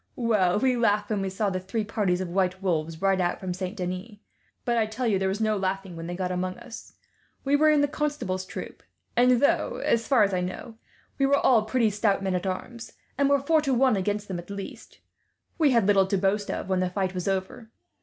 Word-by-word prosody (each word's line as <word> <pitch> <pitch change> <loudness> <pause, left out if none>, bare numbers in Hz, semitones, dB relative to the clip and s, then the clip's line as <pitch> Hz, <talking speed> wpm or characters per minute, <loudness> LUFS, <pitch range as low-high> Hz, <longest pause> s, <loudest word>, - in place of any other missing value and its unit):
Well, 210 -6 +2
we 255 +3 +2
laughed 210 -3 +1
when 205 -2 0
we 195 - -2
saw 195 +1 -1
the 185 - -2
three 195 +4 -3
parties 200 -4 0
of 185 - -3
white 185 0 0
wolves 165 -3 -2
ride 195 -1 +3
out 175 0 -1
from 185 -2 -4
Saint 185 +3 -5
Denis; 185 +4 -5 0.5
but 240 - +1
I 225 -2 +2
tell 230 +4 -4
you, 205 -5 +2
there 190 0 0
was 195 +2 -2
no 215 -1 +1
laughing 190 -1 -3
when 165 0 -7
they 175 - -4
got 180 0 -2
among 185 0 -2
us. 235 - -11 0.5
We 280 +1 +2
were 310 +2 +5
in 300 -1 +4
the 290 - +3
Constable's 285 -11 -2
troop; - - -8 0.3
and 250 +1 +5
though, - - +2
as 230 -1 +1
far 255 -6 +5
as 200 -1 +1
I 180 - 0
know, 185 +6 -5 0.5
we 275 - +4
were 280 +1 +4
all 235 -6 +4
pretty 220 -1 +1
stout 205 -1 +1
men 190 -1 0
at 180 +1 -1
arms, 220 +5 -6 0.2
and 280 0 +2
were 280 - +5
four 310 +3 +2
to 275 -3 0
one 255 -2 +4
against 205 +2 -2
them 185 -3 -4
at 175 - -11
least, 200 -1 -8 0.6
we 305 -3 +5
had 235 -6 +3
little 195 -1 +4
to 195 - +1
boast 200 +2 0
of - - -3
when 190 -1 +1
the 185 0 0
fight 185 0 -2
was 180 0 -4
over. 195 +4 -3
200 Hz, 235 wpm, -26 LUFS, 185-235 Hz, 0.6 s, were